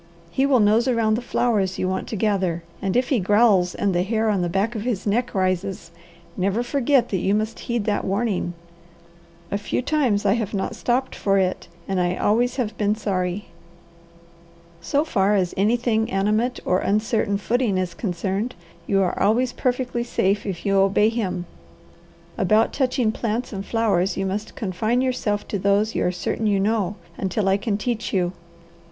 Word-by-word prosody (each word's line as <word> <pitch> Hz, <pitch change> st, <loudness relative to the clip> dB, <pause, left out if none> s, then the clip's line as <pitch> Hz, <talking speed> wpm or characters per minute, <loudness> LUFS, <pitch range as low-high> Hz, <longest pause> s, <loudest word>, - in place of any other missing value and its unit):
He 270 Hz, +9 st, +2 dB
will 265 Hz, -3 st, +4 dB
nose 215 Hz, +4 st, +4 dB
around 230 Hz, -3 st, +2 dB
the 225 Hz, -, 0 dB
flowers 210 Hz, -6 st, 0 dB
you 185 Hz, -, -1 dB
want 190 Hz, 0 st, -2 dB
to -, -, -4 dB
gather, 190 Hz, -5 st, 0 dB, 0.2 s
and 195 Hz, +2 st, 0 dB
if 250 Hz, 0 st, +1 dB
he 260 Hz, -, +2 dB
growls 200 Hz, -2 st, +3 dB
and 200 Hz, -2 st, 0 dB
the 175 Hz, -, +2 dB
hair 220 Hz, +3 st, 0 dB
on 200 Hz, -3 st, +1 dB
the 175 Hz, -, 0 dB
back 195 Hz, +6 st, 0 dB
of 220 Hz, -, -4 dB
his 225 Hz, -4 st, -2 dB
neck 230 Hz, +3 st, 0 dB
rises, 185 Hz, -2 st, -1 dB, 0.4 s
never 200 Hz, +5 st, 0 dB
forget 260 Hz, -1 st, +2 dB
that 190 Hz, -, 0 dB
you 195 Hz, +3 st, +1 dB
must 215 Hz, +1 st, -2 dB
heed 235 Hz, -3 st, -2 dB
that 210 Hz, -1 st, 0 dB
warning. 195 Hz, -3 st, -1 dB, 1.0 s
A 200 Hz, -, 0 dB
few 205 Hz, -, -2 dB
times 255 Hz, -9 st, +1 dB
I 195 Hz, -, +4 dB
have 220 Hz, -2 st, -2 dB
not 195 Hz, -, -2 dB
stopped 255 Hz, +2 st, 0 dB
for 195 Hz, -1 st, +1 dB
it, 185 Hz, -1 st, 0 dB, 0.2 s
and 195 Hz, -1 st, 0 dB
I 180 Hz, 0 st, +1 dB
always 240 Hz, +6 st, +1 dB
have 240 Hz, -5 st, -2 dB
been 210 Hz, 0 st, +2 dB
sorry. 190 Hz, -2 st, -2 dB, 1.3 s
So 285 Hz, -, +1 dB
far 205 Hz, -7 st, +2 dB
as 185 Hz, -3 st, 0 dB
anything 225 Hz, +2 st, +1 dB
animate 215 Hz, +6 st, 0 dB
or 185 Hz, -, +2 dB
uncertain 210 Hz, 0 st, +1 dB
footing 225 Hz, -1 st, 0 dB
is 185 Hz, -1 st, -2 dB
concerned, 195 Hz, +4 st, -2 dB, 0.3 s
you 195 Hz, -1 st, +3 dB
are 180 Hz, -, -1 dB
always 245 Hz, +4 st, +2 dB
perfectly 245 Hz, -1 st, -1 dB
safe 205 Hz, -3 st, 0 dB
if 175 Hz, -4 st, -5 dB
you 195 Hz, -1 st, +3 dB
obey 200 Hz, +2 st, +4 dB
him. 205 Hz, -6 st, -2 dB, 0.9 s
About 220 Hz, +1 st, +3 dB
touching 255 Hz, -4 st, +1 dB
plants 230 Hz, +2 st, -3 dB
and 195 Hz, -1 st, -4 dB
flowers, 200 Hz, -5 st, +1 dB
you 195 Hz, -, -1 dB
must 205 Hz, +3 st, -4 dB
confine 215 Hz, +5 st, 0 dB
yourself 230 Hz, -5 st, -1 dB
to 200 Hz, -, -2 dB
those 200 Hz, +3 st, +2 dB
you -, -, 0 dB
are 180 Hz, -, +1 dB
certain 215 Hz, +4 st, -2 dB
you 200 Hz, -2 st, +2 dB
know, 205 Hz, -1 st, 0 dB, 0.2 s
until 195 Hz, +1 st, -1 dB
I 195 Hz, +1 st, +4 dB
can 205 Hz, 0 st, -1 dB
teach 230 Hz, +1 st, -2 dB
you. 180 Hz, -2 st, 0 dB
210 Hz, 180 wpm, -23 LUFS, 195-235 Hz, 1.3 s, will